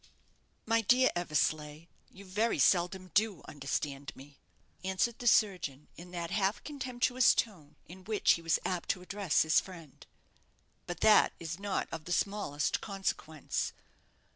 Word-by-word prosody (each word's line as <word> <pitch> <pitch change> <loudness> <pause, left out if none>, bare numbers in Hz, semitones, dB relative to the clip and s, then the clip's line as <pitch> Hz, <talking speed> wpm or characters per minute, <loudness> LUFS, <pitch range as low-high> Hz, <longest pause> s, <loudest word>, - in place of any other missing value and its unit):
"My 230 0 +2
dear 250 +4 +4
Eversleigh, 155 -2 -1 0.2
you 200 +1 -14
very 210 +5 0
seldom 185 +1 +2
do 205 -5 +1
understand 140 0 -4
me," 140 +1 -15 0.4
answered 190 +5 0
the 245 - -3
surgeon, 180 - +2
in 175 +1 -11
that 170 -2 -5
half 200 0 0
contemptuous 255 -3 +2
tone 160 -10 -3
in 185 +2 -13
which 215 -1 +2
he 170 - +1
was 165 -1 +2
apt 180 -2 -2
to 180 - -1
address 195 -3 +1
his 160 0 +4
friend; 170 -7 -12 0.8
"but 175 -1 -6
that 215 -1 +6
is 165 +1 -5
not 200 -1 -2
of 160 -1 -6
the 175 - -2
smallest 195 -9 -1
consequence. 190 -6 -3
185 Hz, 140 wpm, -31 LUFS, 155-210 Hz, 0.8 s, that